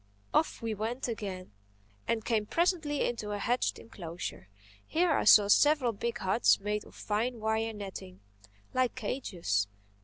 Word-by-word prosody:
Off 315 - +1
we 225 -1 -1
went 225 +5 -3
again 195 - -5 0.6
and 225 -2 0
came 215 -3 0
presently 330 - +1
into 230 -3 -4
a - - -2
hedged 245 +5 0
enclosure. 170 - -7 0.4
Here 340 +1 +2
I 290 - +2
saw 210 -1 +8
several 290 +3 +4
big 235 +3 -3
huts 190 +4 +3
made 210 +1 -2
of - - -16
fine 230 +3 -2
wire 220 +1 0
netting, 190 - -8 0.5
like 255 -1 +1
cages. 180 - -1
220 Hz, 145 wpm, -30 LUFS, 205-250 Hz, 0.6 s, saw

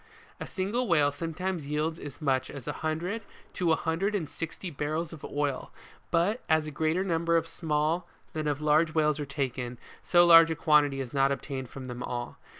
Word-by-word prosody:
WHALE - - -24
FISHING. - - -10
A - - -10
single 210 +6 0
whale 150 -5 +4
sometimes 165 +2 -3
yields 155 +2 -1
as 145 - -8
much 135 -4 0
as 140 -4 -9
a - - 0
hundred 170 +7 -2 0.3
to 175 -3 +1
a - - +5
hundred 180 +7 -1
and 170 -7 -1
sixty 165 +4 -6
barrels 155 +3 -2
of 155 - -11
oil, 145 -2 -2 0.4
but 195 +9 +1
as 160 -1 +3
a 155 - -5
greater 160 +5 0
number 170 -2 +2
of 165 - 0
small, 160 +1 -1 0.3
than 155 -1 -2
of 145 0 -1
large 155 +2 +3
whales 150 -1 +2
are 145 - -3
taken, 130 -3 -3 0.2
so 175 -1 +5
large 165 -1 +9
a 160 - -1
quantity 150 -3 +3
is 125 -2 -7
not 135 0 +3
obtained 135 -2 -4
from 135 -1 -8
them 125 -1 -6
all. 120 -1 -4
155 Hz, 205 wpm, -29 LUFS, 145-170 Hz, 0.4 s, large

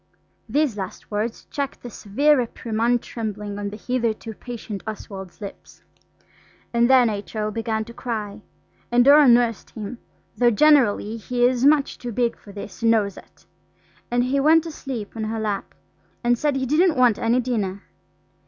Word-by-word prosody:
These 290 -7 +1
last 190 +1 -7
words 215 +2 -3
checked 280 -1 -4
the 245 - -7
severe 285 +11 +2
reprimand 235 -1 0
trembling 210 -3 -5
on 205 0 -3
the 210 - -8
hitherto 230 -1 -2
patient 220 -3 -7
Oswald's 195 -4 -8
lips. 200 -1 -10 0.9
And 235 +1 +3
then 255 -2 +6
H.O. 215 0 -3
began 220 0 -2
to 235 - -11
cry, 215 -4 -5 0.5
and 240 0 +4
Dora 290 +1 +8
nursed 235 -2 +3
him, 225 +2 -7 0.4
though 240 -1 +4
generally 235 -4 +3
he 245 +2 0
is 250 +1 +2
much 290 -1 +3
too 245 - -5
big 235 +1 0
for 205 - -15
this 200 +3 -9
and 230 - +3
knows 210 -4 +2
it. - - -16 0.6
And 245 0 +2
he 265 +3 +1
went 315 +3 +5
to 330 - -6
sleep 250 -9 -6
on 220 -1 -3
her 220 +1 -3
lap, 210 -2 -3 0.5
and 240 0 +3
said 290 +3 0
he 265 -1 -1
didn't 310 +4 +3
want 245 -4 +4
any 235 +2 +2
dinner. 210 -6 -2
235 Hz, 165 wpm, -23 LUFS, 210-255 Hz, 0.9 s, Dora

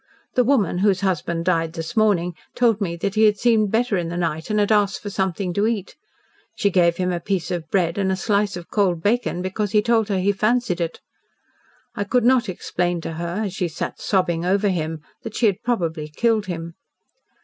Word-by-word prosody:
The 250 - +3
woman 220 -9 +2
whose 195 -1 +2
husband 170 -3 -1
died 165 -3 +1
this 165 +5 -6
morning 195 -6 +2 0.2
told 230 -4 +2
me 170 -4 -1
that 190 +3 -2
he 220 0 +4
had 210 -1 +4
seemed 220 -3 +3
better 225 -1 +1
in 170 -2 -2
the 175 - -4
night, 160 -1 -2
and 210 0 +1
had 205 +1 +2
asked 205 -2 +2
for 205 - -6
something 190 -1 -1
to 205 +4 +1
eat. 215 -4 -3 0.6
She 200 -3 +1
gave 170 -2 +3
him 180 0 0
a 175 - -1
piece 190 +1 -2
of 170 -3 -4
bread 180 -1 +1
and 190 -1 +1
a - - +1
slice 200 -1 0
of 175 - -11
cold 180 -6 +1
bacon, 205 -5 0
because 195 +2 -2
he 210 - +5
told 225 -2 +2
her 195 - +1
he 190 +2 +2
fancied 215 -2 0
it. 165 -1 -3 0.9
I 205 - -2
could 235 +4 +1
not 245 -3 +4
explain 175 -1 -2
to 165 - -5
her, 170 +5 -3
as 195 - -4
she 185 -2 -1
sat 165 - -5
sobbing 180 -4 +1
over 200 +3 +2
him, 160 -3 -2 0.2
that 225 -2 -7
she 240 - +2
had 200 -4 +2
probably 165 -10 -1
killed 215 +6 0
him. 170 -2 -5
190 Hz, 215 wpm, -22 LUFS, 170-210 Hz, 0.9 s, he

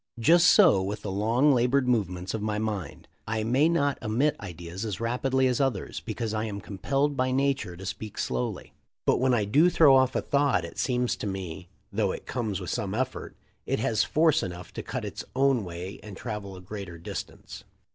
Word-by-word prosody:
Just 170 +9 +5
so 170 - +6
with 100 +3 -4
the 100 - -3
long, 115 +9 +3
labored 125 +1 +2
movements 95 -6 0
of 110 - -3
my 105 0 -1
mind. 105 -4 -4 0.2
I 110 -1 -1
may 130 +8 +3
not 145 -4 +1
emit 120 +8 +1
ideas 90 0 -7
as 105 -5 -3
rapidly 130 +3 +1
as 125 +1 +1
others, 135 -2 -1
because 110 -2 -4
I 110 0 -1
am 100 -2 -4
compelled 135 +10 -1
by 130 0 +1
nature 135 -9 0
to 95 - -9
speak 105 +2 -6
slowly, 60 -1 -3 0.3
but - - +3
when 130 0 +3
I 105 -3 +1
do 150 - +4
throw 155 -6 +6
off 130 -1 +3
a - - +1
thought 140 -11 +2
it 85 - -9
seems 125 -1 +1
to - - -4
me, 90 -3 -5 0.2
though - - +1
it - - -8
comes 110 -6 -2
with 90 -3 -5
some 100 0 -2
effort, 130 +2 -3 0.3
it - - +1
has 110 - +1
force 160 0 +3
enough 90 -1 -7
to - - -4
cut - - -4
its - - -6
own 135 -3 +3
way 90 +2 -7
and 105 -3 -10
travel 105 -4 -6
a 90 - -10
greater 95 -2 -7
distance." 85 - -8
110 Hz, 200 wpm, -27 LUFS, 95-130 Hz, 0.3 s, so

